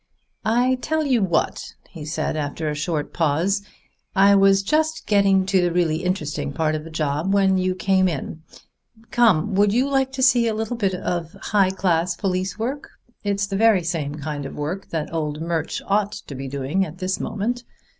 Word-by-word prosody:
"I 250 +3 +2
tell 315 0 0
you 255 -5 +2
what," 175 -4 -1 0.2
he 160 -4 -8
said 155 0 -2
after 155 +1 -3
a 150 - -1
short 150 0 -3
pause, 170 +5 +1 0.5
"I 200 +1 +6
was 195 0 +5
just 315 +8 0
getting 195 -2 +3
to 190 -1 +2
the 175 -1 +1
really 170 -3 +1
interesting 150 -6 -2
part 155 +1 0
of 155 -1 -3
the 165 - -9
job 155 +2 -1
when 190 -1 +3
you 185 0 0
came 190 0 +2
in. 160 -1 -4 0.7
Come: 215 -5 +3
would 200 +1 +3
you 250 +5 +2
like 270 -1 +1
to 265 -1 -1
see 245 -2 +5
a 220 - 0
little 220 +2 -2
bit 195 -5 0
of 175 -2 -3
high 200 -3 +1
class 175 -2 0
police 185 0 -2
work? 260 +6 -4 0.3
It's 200 0 0
the 200 0 -4
very 215 -4 +4
same 160 -4 -2
kind 145 -1 -5
of - - -9
work 165 +7 -4
that 160 0 -3
old 150 -2 -2
Murch 165 -1 -2
ought 205 +1 +1
to 185 - -8
be 135 0 -6
doing 140 +7 -1
at 165 -1 -7
this 185 0 -2
moment. 240 +4 -2
185 Hz, 190 wpm, -22 LUFS, 160-205 Hz, 0.7 s, I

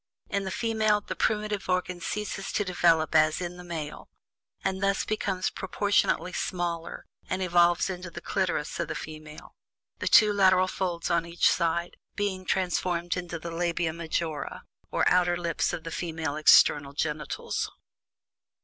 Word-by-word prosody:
In 200 -1 -1
the - - -2
female, 220 -1 +1
the - - -6
primitive 210 -3 -1
organ 180 -1 -1
ceases 205 0 -3
to 210 - 0
develop 170 -3 +2
as 155 0 +4
in 175 0 -5
the 180 - -9
male, 160 -4 -6 0.5
and 190 0 -1
thus 195 0 +1
becomes 195 -3 -1
proportionately 190 -2 0
smaller, 170 -3 -3 0.2
and 185 0 -1
evolves 175 -1 +3
into 180 -1 -5
the 170 - -8
clitoris - - -2
of - - -1
the - - -4
female; 155 -1 -9 0.5
the - - -2
two 210 -1 +6
lateral 185 -2 +4
folds, 175 -3 -2
on 170 -1 +2
each 170 0 +2
side, 170 0 0 0.2
being 190 -2 -2
transformed 175 -2 0
into 175 -2 -4
the 170 +1 -7
labia 170 -1 -1
majora, 165 -1 -3 0.3
or - - +1
"outer 175 -1 +3
lips" 170 -1 -1
of 175 -2 -5
the 165 - -6
female 160 -3 -3
external 145 -2 +5
genitals. 150 0 -2
175 Hz, 150 wpm, -27 LUFS, 165-190 Hz, 0.5 s, two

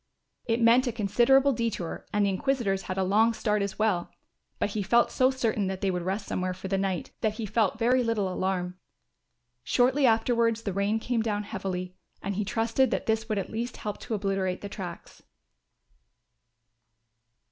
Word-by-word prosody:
It 230 0 +1
meant 240 +3 +5
a - - +1
considerable 240 +6 +3
detour 225 -7 -3
and 205 0 +2
the 200 - +2
inquisitors 200 -2 0
had 185 - -2
a 190 - +2
long 215 +5 +3
start 210 -2 0
as 200 -1 -3
well; 210 -5 +1 0.5
but 205 - -1
he 210 - -2
felt 235 +5 +3
so 255 0 +3
certain 225 -6 0
that 190 0 -4
they 195 - +1
would 180 -1 -2
rest 195 +4 -2
somewhere 185 0 -2
for 190 +1 -7
the 195 - +1
night, 190 -3 -2
that 215 -1 0
he 225 - -4
felt 215 0 +1
very 245 +3 +3
little 225 -4 0
alarm. 185 -1 -2 0.8
Shortly 255 - +3
afterwards 230 0 +2
the 200 - -2
rain 200 +3 +1
came 230 +1 -1
down 210 -2 -1
heavily 185 -3 -4 0.2
and 200 - -3
he 210 +2 -1
trusted 230 +5 +1
that - - -2
this 220 0 0
would 215 - 0
at 195 - -3
least 235 +3 -4
help 210 -1 -5
to 230 - -3
obliterate 195 -2 -1
the 200 - -6
tracks. 180 -4 -8
210 Hz, 180 wpm, -27 LUFS, 190-230 Hz, 0.8 s, meant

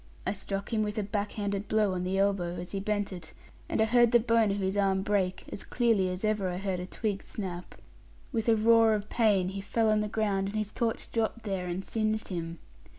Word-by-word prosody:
I - - 0
struck 200 +2 -4
him 220 - +2
with 210 0 -2
a 215 - +1
back 205 0 -2
handed 200 -1 -2
blow 215 -3 +2
on 180 -1 -2
the 185 +1 -1
elbow, 195 -3 +1
as 175 +1 -7
he 195 - -2
bent 205 0 -1
it; 170 -3 -9 0.4
and - - -1
I 220 - +5
heard 240 +1 +4
the 240 - +6
bone 230 -2 +3
of 200 - 0
his 190 0 -1
arm 195 -1 +2
break, 195 -3 0
as - - -4
clearly 225 -6 +2
as 180 +3 -3
ever 210 -3 +1
I 180 - -3
heard 190 -1 -2
a 180 - -5
twig 205 -1 -2
snap. 180 -4 -6 0.6
With 230 -2 0
a 225 - +6
roar 225 0 +5
of 210 0 -4
pain 205 -6 +3
he 195 +1 -5
fell 220 +2 +1
on 215 - +3
the 210 - 0
ground, 205 -3 0
and 210 - -4
his 215 -1 -2
torch 230 -1 -2
dropped 230 0 -1
there, 190 -4 -2
and 180 +2 -3
singed 215 -1 -1
him. 170 -2 -4
205 Hz, 235 wpm, -29 LUFS, 190-220 Hz, 0.6 s, the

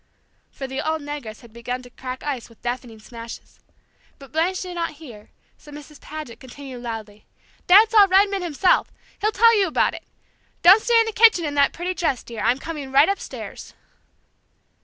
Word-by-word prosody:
for 270 - -8
the 265 +1 -4
old 315 0 -1
negress 285 -7 -7
had 235 -3 -17
begun 245 +2 -5
to 245 - -14
crack 255 +1 -8
ice 270 -6 -4
with 230 - -20
deafening 245 -2 -5
smashes. 230 +1 -11 0.6
But 275 -2 -15
Blanche 335 +5 0
did 365 -1 -7
not 335 -2 -3
hear, 250 -9 -13 0.3
so 295 - -15
Mrs. 295 0 -12
Paget 305 -6 -9
continued 260 -1 -10
loudly: 220 -3 -8 0.4
"Dad 420 +5 +7
saw 420 -3 +7
Redman 395 +1 +3
himself; 350 +2 +1 0.3
he'll 430 - +1
tell 460 +2 +5
you 400 -3 +2
about 320 - +1
it! - - -9 0.6
Don't 385 +5 +8
stay 470 0 +3
in 455 - +3
the 445 - -3
kitchen 435 -6 +5
in 290 - -3
that 280 -1 +3
pretty 355 +2 -4
dress, 320 -8 -1
dear! 230 -3 -8
I'm 240 +4 +2
coming 285 -2 -7
right 280 +6 +5
upstairs." 395 - -6
290 Hz, 180 wpm, -22 LUFS, 245-365 Hz, 0.6 s, Don't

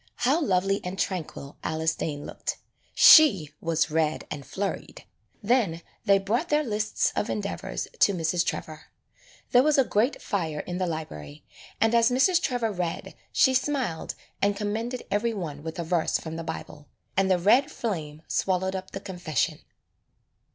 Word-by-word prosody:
How 280 +7 +2
lovely 195 - +1
and 180 +1 -5
tranquil 160 -7 -4
Alice 160 +1 0
Dane 145 -3 -4
looked. - - -4 0.4
She 195 - +8
was 165 -1 0
red 155 -1 0
and 145 -2 -5
flurried. 195 +7 -5 0.4
Then 200 -8 +1 0.2
they 200 0 +5
brought 225 - -1
their 300 0 +3
lists 215 -4 -1
of 210 - -1
endeavors 205 -1 -3
to - - +5
Mrs. 170 +1 +1
Trevor. 155 -1 -5 0.7
There 245 - +7
was 300 +2 +3
a 270 - +6
grate 235 +3 +1
fire 165 -8 -2
in 180 +1 -5
the 185 - 0
library, 75 - -7 0.3
and 225 +1 +3
as 230 -1 +5
Mrs. 285 +8 +3
Trevor 245 -7 0
read 180 -3 -4 0.2
she 260 - +4
smiled 260 - -1 0.3
and 200 0 +2
commended 225 +4 -3
every 225 +3 0
one 155 -7 -5
with 160 +2 -6
a 170 - -2
verse 165 0 +1
from 160 0 -7
the 165 - -5
Bible, 160 -2 -7 0.3
and 195 0 +2
the 185 - +4
red 240 +11 +4
flame 160 - -4
swallowed 190 0 0
up 190 0 -6
the 195 - -4
confession. 175 - -2
190 Hz, 160 wpm, -26 LUFS, 160-230 Hz, 0.7 s, She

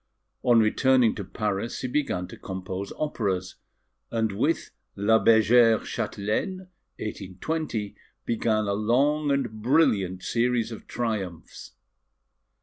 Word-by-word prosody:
On 120 -2 +5
returning 125 +2 +4
to 100 - -5
Paris 105 +3 -3
he 130 - -2
began 125 -10 -1
to - - -9
compose 95 +1 -6
operas; 100 -11 -2 0.5
and 110 -2 0
with 145 +12 -1 0.2
La 110 +3 +3
Bergère 115 0 +5
Châtelaine 110 - -2 0.4
(1820), 105 - -4 0.3
began 110 -2 +1
a 100 - 0
long 140 +8 +2
and 120 -6 -1
brilliant 105 - +2
series 120 -1 0
of 110 - -9
triumphs. 100 -8 -4
110 Hz, 110 wpm, -26 LUFS, 100-125 Hz, 0.5 s, On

